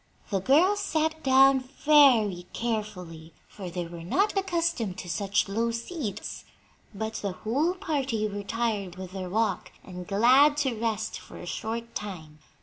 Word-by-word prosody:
The 195 - +1
girls 330 - +4
sat 315 -4 -1
down 270 0 +5
very 255 -9 +4
carefully, 180 -8 -4
for 190 -3 -8
they 175 0 -4
were 170 0 -9
not 390 - +1
accustomed 335 - -1
to - - -7
such 200 +3 0
low 225 +4 0
seats; 230 - -5 0.5
but 220 +1 -4
the 200 -2 -3
whole 280 - 0
party 275 - -1
were 205 0 -5
tired 205 -4 -2
with 185 -1 -8
their 185 -1 -5
walk 220 +2 -1
and 180 -1 -9
glad 255 +8 +5
to 260 - 0
rest 220 -1 -2
for - - -13
a - - -9
short 230 0 -5
time. 160 -7 -7
220 Hz, 150 wpm, -27 LUFS, 195-275 Hz, 0.5 s, down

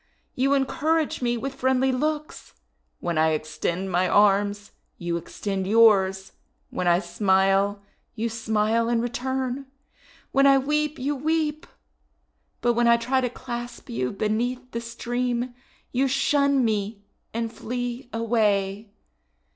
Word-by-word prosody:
You 275 +2 +2
encourage 300 +3 0
me 240 -1 0
with 270 +3 -4
friendly 260 0 +2
looks. 300 +3 -3 0.5
When 170 -2 -1
I 160 0 +3
extend 170 +5 -3
my 180 +1 +2
arms, 205 0 +3 0.3
you 170 -1 -2
extend 190 +2 -4
yours; 195 -3 +4 0.4
when 180 - -2
I 175 0 +5
smile 195 +1 +2 0.3
you 230 +1 -1
smile 225 0 0
in 235 -1 +2
return; 260 +2 -2 0.6
when 275 +1 +5
I 275 0 +6
weep, 300 +2 0
you 285 +2 -1
weep; 310 +1 -1 0.9
but 240 0 +3
when 240 0 +2
I 235 0 +6
try 255 +3 0
to 250 - 0
clasp 240 0 -7
you 125 +2 -1
beneath 245 +5 -2
the 235 - -3
stream, 240 +1 -2 0.4
you 265 +2 +2
shun 280 0 +2
me 210 -1 -2 0.3
and 230 0 -3
flee 245 +2 -4
away! 210 -3 0
235 Hz, 130 wpm, -25 LUFS, 205-260 Hz, 0.9 s, I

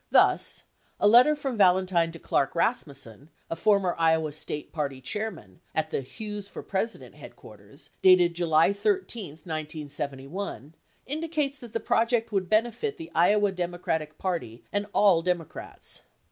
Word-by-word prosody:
Thus, - - +3 0.4
a - - +4
letter 245 +8 +7
from 270 -6 -4
Valentine 180 -3 +4
to - - -8
Clark 140 -3 0
Rasmussen, 140 - -2 0.2
a - - 0
former 195 -2 +2
Iowa 160 -2 +3
State 150 0 -6
Party 140 -4 -3
Chairman, 210 +3 -6
at 155 0 -1
the - - -1
"Hughes 210 - -6
for - - -8
President" 210 +4 -3
headquarters - - -13
dated 180 -2 +6
July 165 +1 +3
13, 235 - -1 0.2
1971, 150 0 -5 0.3
indicates 300 -1 -2
that 240 -3 -11
the 230 - 0
project 230 0 +1
would 190 -3 -1
benefit 240 - +1
the 330 0 -9
Iowa 205 +4 +4
Democratic 175 -4 -3
Party 165 -11 -3
and 205 0 -1
all 200 -4 +5
Iowa 165 - -2
Democrats. 175 -3 -4
185 Hz, 140 wpm, -27 LUFS, 160-220 Hz, 0.4 s, letter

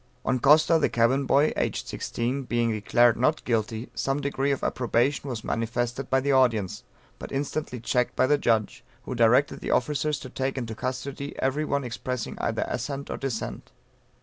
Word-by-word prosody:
On 130 -1 +1
Costa, 155 +5 +5
the - - +2
cabin 130 +4 +2
boy, 145 +3 +4
(aged - - -2
16) 125 +4 -2
being 120 -1 +1
declared 115 +2 +3
"Not 130 +6 +1
Guilty" 115 0 -1
some 135 +1 -1
degree 140 0 -1
of 140 - -2
approbation 130 +3 0
was 115 -4 -4
manifested 120 +3 -2
by 135 - +3
the 140 +1 +1
audience, 115 -8 +2 0.4
but - - -8
instantly 140 -2 -3
checked 125 +1 0
by 130 - +3
the 145 +2 +3
judge, 110 -5 0 0.2
who - - -5
directed 120 +4 +3
the - - -5
officers 150 +3 +1
to 130 - -8
take 135 +1 -2
into 115 -3 -3
custody, 135 +4 -5
every 140 +4 0
one 140 -1 -1
expressing 125 0 -4
either - - -1
assent 140 +3 -4
or - - -3
dissent. 130 -5 -4
130 Hz, 175 wpm, -26 LUFS, 120-140 Hz, 0.4 s, Costa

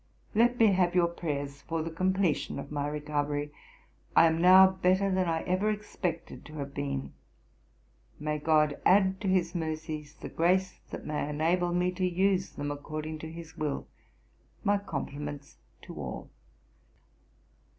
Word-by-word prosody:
'Let 240 +3 +3
me 225 -3 +6
have 180 -1 +2
your 175 -1 +4
prayers 145 -5 -4
for 165 -1 -3
the 165 - -4
completion 185 0 0
of 140 - -7
my 145 -1 -1
recovery: 145 0 -2 0.6
I - - +8
am 165 0 +2
now 185 +2 +9
better 190 +1 +2
than 185 -1 +1
I 165 -1 0
ever 185 +4 +1
expected 205 -5 -4
to 150 - -12
have 140 -2 -5
been. 70 - -3 1.1
May 150 0 -2
GOD 150 -1 +2
add 190 0 +4
to 200 - -2
his 180 -2 +2
mercies 155 -3 -4
the - - -8
grace 185 +3 +1
that - - -7
may 150 -1 -2
enable 170 +4 +1
me 180 +1 +1
to 185 +1 -4
use 185 +1 +2
them 145 0 -4
according 155 +2 -5
to 160 +1 -7
his 165 -1 -10
will. 150 -3 -2 0.8
My 205 0 +3
compliments 145 -6 -6 0.3
to - - -9
all.' - - -6
165 Hz, 150 wpm, -29 LUFS, 150-185 Hz, 1.1 s, now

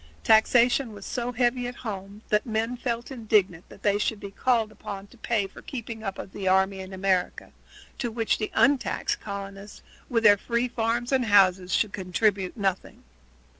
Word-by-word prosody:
Taxation 240 +2 +4
was 200 -1 -10
so 245 -1 -3
heavy 245 0 +1
at 245 - -6
home 200 0 -6
that 210 0 +2
men 225 +1 -1
felt 235 0 -3
indignant 210 -8 0
that - - -15
they 205 0 +2
should 210 0 -1
be 200 - -8
called 230 0 +1
upon 200 -2 -8
to 205 - -19
pay 220 -3 0
for 195 - -12
the - - -29
keeping 230 -3 -6
up 195 -2 -4
of - - -8
the 190 -1 -5
army 190 +1 +3
in 190 0 -8
America, 190 -1 -1 0.5
to 240 - -1
which 225 -1 0
the 215 - -2
untaxed 280 -1 +2
colonists, 200 0 -8 0.3
with 230 -3 +1
their 205 -1 +7
free 235 +4 -1
farms 235 +1 -1
and 260 -2 +2
houses, 190 -3 +4
would 210 - -14
contribute 190 +1 0
nothing. 195 -3 -2
215 Hz, 180 wpm, -26 LUFS, 195-235 Hz, 0.5 s, their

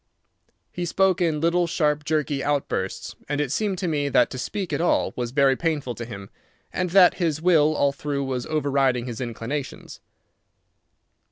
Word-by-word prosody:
He 175 - -4
spoke 190 +1 +2
in 160 -3 +1
little, 170 +1 +2
sharp, 150 -3 0
jerky 150 -3 -1
outbursts, 140 -10 -2
and 145 0 -1
it 145 -4 -1
seemed 200 +2 -1
to 180 0 -2
me 145 -3 0
that 125 - +3
to 130 - -5
speak 185 - -4
at - - 0
all 175 - +1
was 120 -1 -3
very 135 +1 +3
painful 150 -5 -2
to 120 - -7
him, 100 -4 -9 0.4
and 180 0 -1
that 180 0 +6
his 160 -3 0
will 155 -3 +3
all 140 -1 +2
through 140 0 -3
was 130 -2 -3
overriding 135 -5 +1
his 120 -2 -6
inclinations. 125 +4 -5
145 Hz, 170 wpm, -24 LUFS, 130-170 Hz, 0.4 s, that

